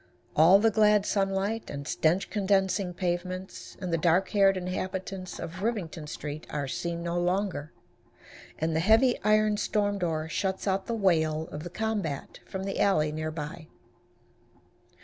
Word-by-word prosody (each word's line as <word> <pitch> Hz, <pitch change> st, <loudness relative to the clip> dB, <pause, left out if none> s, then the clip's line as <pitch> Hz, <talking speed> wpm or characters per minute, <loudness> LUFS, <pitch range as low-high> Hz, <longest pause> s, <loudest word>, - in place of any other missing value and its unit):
All 165 Hz, +5 st, +7 dB
the 225 Hz, +2 st, +3 dB
glad 210 Hz, -1 st, +4 dB
sunlight, 195 Hz, +3 st, -1 dB
and 140 Hz, 0 st, -6 dB
stench 170 Hz, +5 st, +1 dB
condensing 195 Hz, -2 st, +1 dB
pavements, 185 Hz, +1 st, -4 dB
and 180 Hz, -3 st, -3 dB
the 165 Hz, -, +2 dB
dark 175 Hz, +3 st, +3 dB
haired 195 Hz, -2 st, +4 dB
inhabitants 185 Hz, +1 st, -4 dB
of 170 Hz, +3 st, -7 dB
Rivington 180 Hz, -9 st, -3 dB
street, 150 Hz, +1 st, -6 dB
are 145 Hz, -2 st, -3 dB
seen 170 Hz, +4 st, -3 dB
no 170 Hz, 0 st, -1 dB
longer, 175 Hz, -4 st, -1 dB, 0.9 s
and 160 Hz, 0 st, -1 dB
the -, -, +2 dB
heavy 220 Hz, +7 st, +4 dB
iron 215 Hz, 0 st, +3 dB
storm 205 Hz, -1 st, 0 dB
door 160 Hz, -3 st, -1 dB
shuts 190 Hz, +4 st, -2 dB
out 190 Hz, 0 st, 0 dB
the 235 Hz, -, -1 dB
wail 160 Hz, -6 st, +1 dB
of 150 Hz, -, -6 dB
the 175 Hz, -, -6 dB
combat 200 Hz, -7 st, -3 dB
from 190 Hz, 0 st, -5 dB
the 195 Hz, 0 st, -3 dB
alley 155 Hz, -7 st, +3 dB
near 155 Hz, +1 st, -3 dB
by. 155 Hz, +1 st, -6 dB
185 Hz, 150 wpm, -28 LUFS, 160-200 Hz, 0.9 s, All